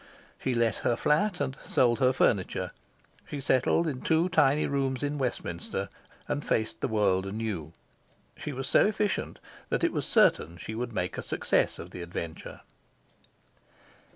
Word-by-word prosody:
She 130 -2 -1
let 115 -2 +2
her 120 - +1
flat 180 - +1
and 135 -2 -1
sold 120 -2 +3
her 130 -1 +4
furniture. 105 -7 +1 0.6
She 145 - -5
settled 135 +5 +2
in 140 -5 -3
two 165 +2 +2
tiny 145 -4 +4
rooms 135 -1 -1
in 145 0 -1
Westminster, 115 -9 -3 0.4
and 145 - -2
faced 110 0 -1
the - - +1
world 100 -3 +2
anew. 95 -7 -4 0.6
She 150 - -5
was 135 0 -4
so - - +5
efficient 210 -1 -1 0.3
that - - 0
it - - +2
was - - -2
certain 85 +3 +3
she 110 - -6
would 120 +2 -3
make 90 -4 -2
a - - -2
success - - +1
of - - -9
the 90 - -7
adventure. 85 -1 -6
125 Hz, 155 wpm, -29 LUFS, 105-145 Hz, 0.6 s, so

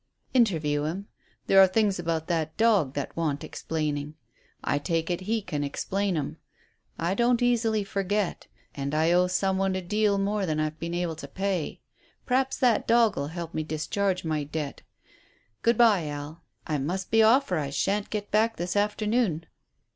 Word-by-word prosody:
"Interview 160 - +2
him. 180 +6 -3 0.4
There 195 - +5
are 190 - +8
things 200 -1 +1
about 165 -2 -1
that 160 -2 -2
dog 205 - +3
that 145 - -4
want 155 -4 -1
explaining. 150 -2 -3 0.5
I 145 - +1
take 165 +2 -1
it 175 - -2
he 225 -2 +1
can 150 -6 -3
explain 190 +6 -1
'em. 145 - -3 0.6
I 170 +3 0
don't 240 +3 +2
easily 225 -3 +2
forget. 200 0 -2 0.3
And 140 +1 -3
I 160 +2 +3
owe 180 +1 +4
some 190 +1 0
one 195 -1 +1
a 190 - -2
deal 210 +2 +1
more 200 0 0
than 155 -1 -1
I've 155 0 0
yet 155 - -31
been 170 +1 -3
able 175 -2 -2
to 140 - -7
pay. 190 +1 -2 0.4
P'r'aps 265 +1 +1
that 245 -4 +2
dog'll 225 -11 +3
help 170 +1 -6
me 155 - -1
to 155 - -7
discharge 185 +4 -1
my 155 -2 -1
debt. 150 0 -5 0.8
Good 235 -1 +3
bye, 210 -9 +4
Al; 145 +3 -6 0.2
I 150 -2 -1
must 180 +7 -3
be 225 - +5
off 235 +2 +4
or 180 - +2
I 140 -2 -2
shan't 195 +9 -1
get 210 -1 -4
back 220 +2 +2
this 175 +2 -3
afternoon." 210 -4 +1
180 Hz, 180 wpm, -27 LUFS, 155-210 Hz, 0.8 s, are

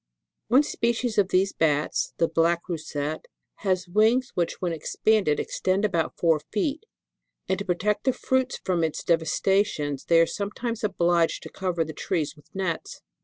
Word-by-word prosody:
One 255 +6 +5
species 235 -4 0
of 195 - +4
these 190 +2 +2
Bats, 150 -2 0
(the 165 - +3
black 165 +1 +1
Roussette,) 155 -3 -4 0.3
has 185 -3 -1
wings 220 +7 +3
which, 170 -1 -1
when 175 -2 -1
expanded, 175 +1 +1
extend 190 +2 0
about 170 -6 -1
four 165 -2 +3
feet, 290 - -2 0.6
and, 190 0 0
to 200 - -4
protect 200 +4 0
the 260 - +4
fruits 260 +1 0
from 175 -3 0
its 160 -2 -2
devastations, 160 -3 +1
they 165 -1 +5
are 165 - +6
sometimes 225 +5 -4
obliged 175 -4 +1
to - - -8
cover 180 -3 -1
the 155 - -7
trees 150 0 -2
with 150 +1 -21
nets. 185 -4 -3
180 Hz, 160 wpm, -26 LUFS, 165-210 Hz, 0.6 s, are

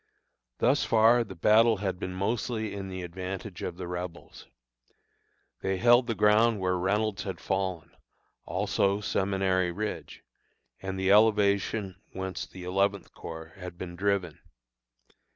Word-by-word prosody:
Thus - - +3
far 115 +2 +5
the 100 -4 -10
battle 110 +5 +5
had 95 -2 -3
been 90 0 -4
mostly 110 +2 -2
in 100 -1 -5
the 95 -1 -6
advantage 95 +2 -6
of 85 - -4
the 90 -1 -5
Rebels. 90 -1 -7 1.1
They 95 0 -1
held 120 +4 +5
the 115 - -1
ground 105 +1 +4
where 90 -1 +1
Reynolds 100 +3 0
had 95 -3 -5
fallen, 95 -3 -2 0.5
also 100 +1 0
Seminary 95 -3 0
Ridge, 105 +4 -5 0.6
and 95 0 -4
the 95 0 +2
elevation 100 -2 +3
whence 95 0 -4
the 90 - -11
Eleventh 100 +1 0
Corps 80 0 -9
had 90 -2 -8
been 85 -1 -7
driven. 95 -3 -1
95 Hz, 135 wpm, -28 LUFS, 90-105 Hz, 1.1 s, far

